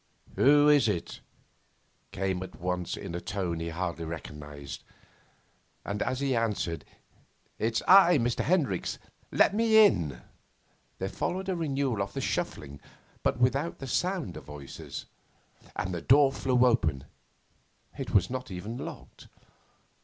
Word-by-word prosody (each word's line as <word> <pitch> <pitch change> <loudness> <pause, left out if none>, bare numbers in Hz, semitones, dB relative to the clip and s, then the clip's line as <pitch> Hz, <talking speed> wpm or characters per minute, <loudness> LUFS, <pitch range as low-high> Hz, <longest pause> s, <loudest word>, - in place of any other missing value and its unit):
'Who 145 +2 +6
is 145 -4 +5
it?' 90 -6 -3 0.9
came 95 -1 -2
at 95 - -8
once, 90 0 -2
in - - -6
a 85 - -4
tone 90 -4 -3
he 85 0 -3
hardly 85 0 -3
recognised. 75 -3 -8 1.0
And, 100 +1 -3
as 130 +1 -1
he 135 -2 +1
answered, 105 -8 -1 0.7
'It's 115 +1 0
I, 180 -3 +8
Mr. 120 -2 0
Hendricks; 145 - 0 0.3
let - - +4
me 220 0 +6
in,' 75 - 0 0.7
there 95 - -2
followed 190 - -3
a 185 - 0
renewal 140 - -1
of 100 0 -3
the - - -3
shuffling, 70 -1 -3 0.4
but - - +1
without 135 +6 +1
the 135 - -7
sound 175 - -1
of - - -9
voices, 75 -2 -8 0.7
and 90 - -2
the 85 - -3
door 140 +1 +5
flew 130 -2 +2
open 80 - +2 0.9
it - - -5
was 95 -2 +4
not 130 0 -5
even 100 +5 -6
locked. - - -9
105 Hz, 140 wpm, -29 LUFS, 85-140 Hz, 1.0 s, I